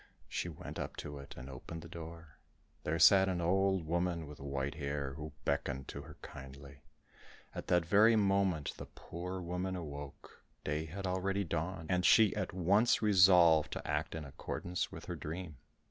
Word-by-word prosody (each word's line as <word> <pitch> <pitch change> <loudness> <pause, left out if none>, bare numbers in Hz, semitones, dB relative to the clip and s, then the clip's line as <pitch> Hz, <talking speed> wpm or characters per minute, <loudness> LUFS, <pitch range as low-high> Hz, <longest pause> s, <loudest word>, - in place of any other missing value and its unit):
She 85 - -3
went 80 - -8
up - - -4
to 75 -1 -6
it 70 - -10
and 65 +1 -8
opened 70 +5 -8
the - - -9
door; 80 -3 -10 0.4
there 80 +2 0
sat 95 +4 +7
an 90 -2 -1
old 95 +1 +2
woman 85 0 -1
with 75 0 -11
white 70 0 -3
hair, 70 -1 -3
who 75 +2 -7
beckoned 65 0 -1
to - - -6
her - - -12
kindly. 70 +1 -10 0.7
At - - -6
that 90 -1 +3
very 105 +6 +6
moment, 95 -7 +2
the - - -8
poor 90 +2 -6
woman 90 +1 -3
awoke, 75 -5 -8 0.2
day 75 +1 -1
had 95 +5 -6
already 95 +2 0
dawned, 85 0 -3
and 90 -1 +2
she 110 +2 +6
at - - -2
once 100 +7 +3
resolved 90 -6 +6
to - - -6
act 75 +2 -1
in 80 -2 -5
accordance 85 +5 -4
with - - -9
her - - -4
dream. 80 -1 -6
85 Hz, 175 wpm, -34 LUFS, 75-95 Hz, 0.7 s, sat